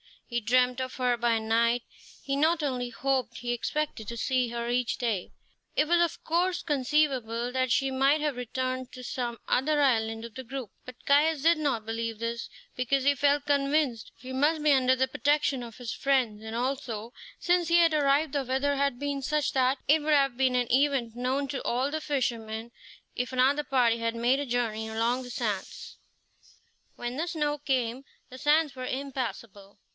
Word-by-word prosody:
He 240 - -2
dreamed 250 +3 +2
of 255 0 -4
her 250 -1 +1
by 235 -1 +2
night; 230 +2 +1 0.4
he 275 0 -1
not 315 +2 +2
only 250 -3 -2
hoped, 255 -1 -1
he 240 0 -3
expected 240 -1 -2
to 235 - -5
see 255 +1 +1
her 235 0 -4
each 245 -1 0
day. 220 -7 -2 0.4
It 300 - +2
was 345 +1 +3
of 340 -2 -1
course 350 +2 0
conceivable 260 -5 0
that 255 0 0
she 270 +2 +2
might 275 +3 +3
have 295 -4 -1
returned 255 +1 -3
to 250 - -9
some 240 -2 -3
other 295 +4 +2
island 225 -4 +1
of 235 -1 -8
the 260 +3 -8
group; 255 -3 -6
but 255 -1 -12
Caius 295 +1 +3
did 335 +1 +5
not 265 -8 -1
believe 225 0 -3
this, 230 +1 -4 0.3
because 260 +2 +1
he 285 +1 +4
felt 285 +1 +2
convinced 280 -4 +1
she 255 0 -9
must 295 +4 +1
be 300 - +5
under 260 -2 +4
the 260 0 +1
protection 285 +1 +1
of 230 -2 -9
his 245 -3 -5
friends; 255 -6 +1
and 220 +1 -6
also, 240 -3 -3 0.3
since 350 -1 +1
he 340 +1 +4
had 335 -2 +5
arrived 290 0 +2
the 280 -2 -1
weather 270 +2 0
had 280 -2 +1
been 285 +1 -3
such 300 +2 0
that 260 0 +2
it 310 +2 +5
would 305 +1 +1
have 275 -3 +3
been 260 -1 +2
an 245 -1 0
event 265 -3 +2
known 255 +3 -1
to 270 - -3
all 255 +4 0
the 315 +1 -2
fishermen 235 -5 -2 0.4
if 250 +1 -3
another 270 +4 +3
party 245 -4 +3
had 230 0 -1
made 240 +4 +2
a 285 - -2
journey 230 -2 -1
along 230 +3 0
the 245 - -9
sands. 215 -5 -4 1.0
When 240 +1 -5
the 330 +3 -1
snow 295 -3 -1
came 260 -2 -1 0.2
the 255 - -10
sands 300 0 +2
were 255 -1 -5
impassable. 235 -7 -5
255 Hz, 190 wpm, -28 LUFS, 235-285 Hz, 1.0 s, did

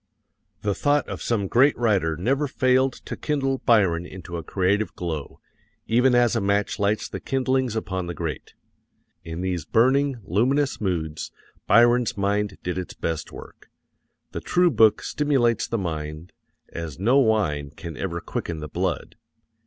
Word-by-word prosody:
The 105 -1 +1
thought 145 +6 +1
of - - -6
some 110 -4 0
great 135 +8 +4
writer 95 -9 +1
never 135 - 0
failed 130 0 +2
to - - -5
kindle 135 -3 -1
Byron 95 -8 +3
into 90 -2 -9
a 85 - -3
creative 100 +5 0
glow, 80 -5 -5 0.5
even 125 +2 +3
as 120 -1 +3
a 115 - +1
match 100 +1 0
lights 105 +1 +1
the - - -6
kindlings 130 -3 0
upon 95 -5 -3
the 85 - -5
grate. 75 -6 -5 0.7
In 85 +1 -6
these 90 -3 -2
burning, 130 - +2
luminous 130 - +1
moods 80 -6 -2 0.4
Byron's 120 +1 +4
mind 100 0 0
did 90 0 -2
its 90 - -7
best 80 -2 -3
work. - - -12 0.6
The - - -5
true 180 -1 +3
book 110 -4 +4
stimulates 135 -6 +1
the 115 - -1
mind 80 -2 -5 0.4
as 85 -4 -6
no 120 +9 +3
wine 90 - +1
can 80 +2 -9
ever 85 +5 -3
quicken 85 -1 -4
the 75 - -6
blood. 90 -3 -3
105 Hz, 155 wpm, -24 LUFS, 85-125 Hz, 0.7 s, great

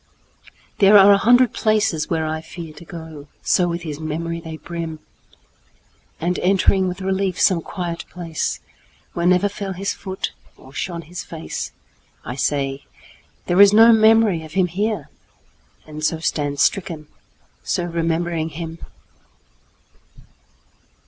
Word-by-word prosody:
There 205 +1 +7
are 200 0 +8
a 200 - +6
hundred 245 +2 +5
places 210 -8 +1
where 160 -1 0
I 155 0 -3
fearTo 160 -1 -10
go,—so 160 +2 -2
with 170 0 -3
his 150 -3 -5
memory 165 +2 -3
they 160 -1 -8
brim! 165 -1 -6 1.2
And 175 +2 -1
entering 190 0 +3
with 180 +1 -5
relief 190 -1 -1
some 180 -3 +3
quiet 175 -1 -5
placeWhere 170 0 -5
never 180 +2 +4
fell 200 -1 -5
his 195 +2 -2
foot 190 -1 -5 0.3
or 135 - -16
shone 170 +1 -4
his 175 +4 -7
faceI 165 -1 -6 0.6
say, 135 0 -1 0.6
"There 180 +3 +4
is 200 0 +8
no 225 +2 +8
memory 220 -5 +4
of 155 - -11
him 190 -1 +3
here!"And 175 -4 -7
so 160 +1 +1
stand 145 -3 -2
stricken, 165 -5 0 0.6
so 175 - -1
remembering 165 -1 -1
him! 165 +1 -7
170 Hz, 120 wpm, -21 LUFS, 160-195 Hz, 1.2 s, are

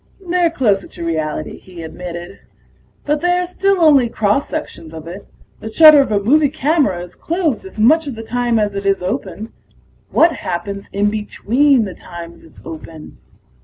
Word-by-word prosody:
"They're 350 -1 +2
closer 230 -11 0
to 170 - -8
reality," 155 -2 -3
he 180 -3 -11
admitted. 175 +2 -8 0.7
"But 295 0 0
they 355 +1 +2
are 360 - 0
still 390 +2 0
only 285 -7 +5
cross 215 +5 0
sections 165 - -6
of 160 -1 -9
it. 180 +4 -9 0.3
The 220 - -7
shutter 305 +4 +8
of 270 - -2
a 205 - +2
movie 285 +8 +3
camera 280 - 0
is 180 0 -12
closed 320 - -2
as 190 - -12
much 300 +8 +4
of 270 - -5
the 225 - -7
time 240 0 0
as 210 -2 0
it 200 0 -3
is 195 -2 +1
open. 215 +4 -4 0.6
What 330 +1 +4
happens 200 +3 -5
in 205 +1 +1
between 235 +4 +1
the 190 - -6
times 170 -1 -11
it's 160 - -18
open? 160 -1 -10
215 Hz, 175 wpm, -18 LUFS, 180-295 Hz, 0.7 s, shutter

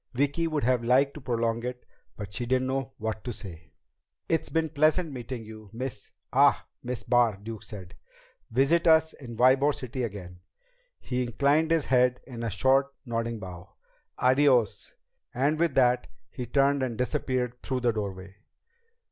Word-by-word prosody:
Vicki 145 +5 +1
would 155 -3 -1
have 125 0 +2
liked 135 +4 +3
to 150 - -10
prolong 115 -2 -1
it, 125 0 -5 0.3
but 100 -1 -7
she 120 +5 -3
didn't 130 +1 +1
know 130 -2 -2
what 110 0 -4
to 125 - -4
say. 85 -7 -10 0.6
"It's 165 - 0
been 160 -1 0
pleasant 155 +2 +2
meeting 125 -2 -6
you, 110 -1 -11
Miss 125 +1 -6 0.2
ah - - +4 0.2
Miss 125 -1 -5
Barr," 120 -4 +3
Duke 110 +1 -8
said. 95 -4 -10 0.6
"Visit 140 +8 +3
us 160 0 +5
in 120 -5 -10
Ybor 135 +4 +4
City 130 0 -5
again." 95 -6 -6 0.6
He 125 0 -2
inclined 140 +6 +2
his 165 -3 +2
head 125 -1 +3
in 120 -3 -8
a 115 - -1
short, 135 +7 +2
nodding 115 -1 -2
bow. 95 -1 -10 0.4
"Adiós." 130 -4 +2 0.4
And 145 +5 +1
with 165 -5 +1
that 125 -1 +3 0.2
he 125 -3 -6
turned 140 +2 +2
and 125 -4 -2
disappeared 125 -2 -2
through 130 -1 -2
the 120 -1 +3
doorway. 100 -2 -5
125 Hz, 160 wpm, -27 LUFS, 115-140 Hz, 0.6 s, us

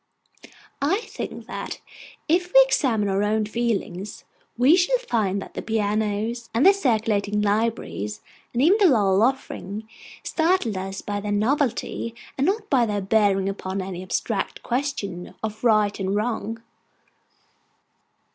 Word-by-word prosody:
I 355 +10 +2
think - - -7
that - - -6 0.5
if 350 +3 +2
we - - +9
examine 235 - +1
our 195 0 +1
own 215 +1 +1
feelings, 210 -4 -3 0.3
we 260 +7 +6
shall 370 +8 +3
find 215 - -1
that - - -9
the - - -4
pianos, 220 +2 -1
and 240 - +3
the 390 - +9
circulating 215 - +1
libraries, 210 - -1 0.3
and 245 +2 +1
even 380 +8 +5
the 400 - +6
Lowell 205 - +3
Offering, 220 -4 -1 0.4
startle 320 - +1
us 190 +1 -5
by 205 -1 -3
their 205 0 -4
novelty, 230 +1 0 0.2
and 275 - +1
not 420 +2 0
by 250 - +3
their 205 -1 -1
bearing 195 -1 +2
upon 195 -1 -3
any 185 -1 -5
abstract 185 - -2
question 235 -9 -3
of 215 +1 -4
right 215 -3 +3
or 190 -1 -1
wrong. 225 +2 -2
220 Hz, 135 wpm, -24 LUFS, 200-265 Hz, 0.5 s, we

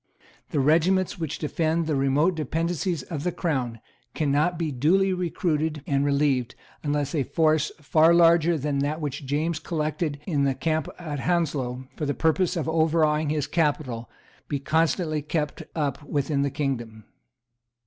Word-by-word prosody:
The 145 - -1
regiments 170 +7 +2
which 160 -3 -3
defend 160 +1 0
the 155 -2 0
remote 140 +6 +2
dependencies 165 +1 -2
of 155 -5 -5
the 180 - 0
Crown 130 -10 -2 0.4
cannot 155 +3 +1
be 160 -2 -1
duly 185 +9 +2
recruited 160 -4 -1
and 140 0 +1
relieved, 140 -3 +1 0.3
unless 145 -1 -1
a 150 - +1
force 155 +3 +2
far 155 +2 +4
larger 170 -1 +5
than 145 -1 -1
that 145 +3 -1
which 140 -2 -4
James 155 +4 0
collected 155 -1 -2
in 145 -6 0
the 135 -1 +1
camp 160 0 -1
at 155 -5 -5
Hounslow 135 -6 -1
for 150 - -3
the 145 - -1
purpose 165 +2 +1
of 160 - -2
overawing 160 -1 +2
his 150 -2 0
capital 145 -8 -1 0.4
be 145 - -1
constantly 155 +2 +1
kept 150 0 -2
up 145 -3 -1
within 145 -1 -1
the 140 - +1
kingdom. 120 -6 -3
150 Hz, 150 wpm, -25 LUFS, 140-165 Hz, 0.4 s, larger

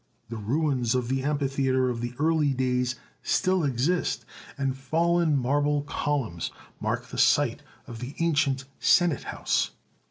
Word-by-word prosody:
The 115 - -5
ruins 125 +1 0
of 125 -2 -1
the 135 0 0
amphitheatre 135 -2 +1
of 120 -2 -2
the 120 +1 -4
early 155 -1 +2
days 125 0 0 0.3
still 185 -2 +1
exist, 145 +6 0 0.3
and 135 -1 -1
fallen 160 +3 +2
marble 145 +3 +1
columns 140 - -2 0.3
mark - - -2
the - - -5
site - - +3 0.2
of 115 -1 -8
the 125 +4 -7
ancient 145 -5 +1
senate 175 -6 +3
house. - - 0
135 Hz, 135 wpm, -27 LUFS, 125-150 Hz, 0.3 s, site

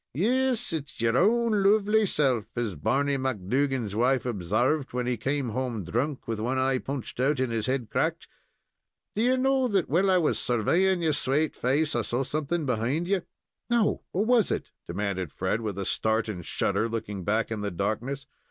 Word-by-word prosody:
"Yes, 245 - +2
it's 150 -2 -5
your 115 +1 +2
own 220 - +3
lovely 210 +1 +4
self, 130 - +2
as 120 -4 -1
Barney 140 - 0
McDougan's 130 -1 -1
wife 125 +3 +2
obsarved, 120 - 0
when 125 0 -1
he 125 0 0
came 135 +3 -1
home 120 -3 -3
drunk, 130 - -2
with 115 -2 -2
one 125 +4 -1
eye 130 0 +1
punched 135 -3 -6
out 135 +2 +2
and 130 -2 0
his 115 -1 -1
head 130 -3 -1
cracked. - - -1 0.9
Do 215 - 0
ye 255 +2 +3
know 265 0 +2
that 195 -6 0
while 180 +7 +3
I 185 - +5
was 165 -4 +1
surveying 170 - +2
your 155 -2 +2
swate 145 +2 0
face 145 +4 +1
I 120 - +2
saw 120 +4 -1
something 155 +4 -2
behind 130 +7 0
ye?" 195 -1 +1 0.5
"No. 235 -3 +2
What 195 +4 0
was 235 -3 +3
it?" - - -3 0.2
demanded 95 -2 -3
Fred, 95 +8 -1
with 105 -4 -4
a 100 - -3
start 110 +3 0
and 95 -5 -5
shudder, 115 +7 0
looking 105 -4 -4
back 110 +5 0
in 110 -2 -3
the 105 - -1
darkness. 115 +10 -3
130 Hz, 185 wpm, -27 LUFS, 115-170 Hz, 0.9 s, I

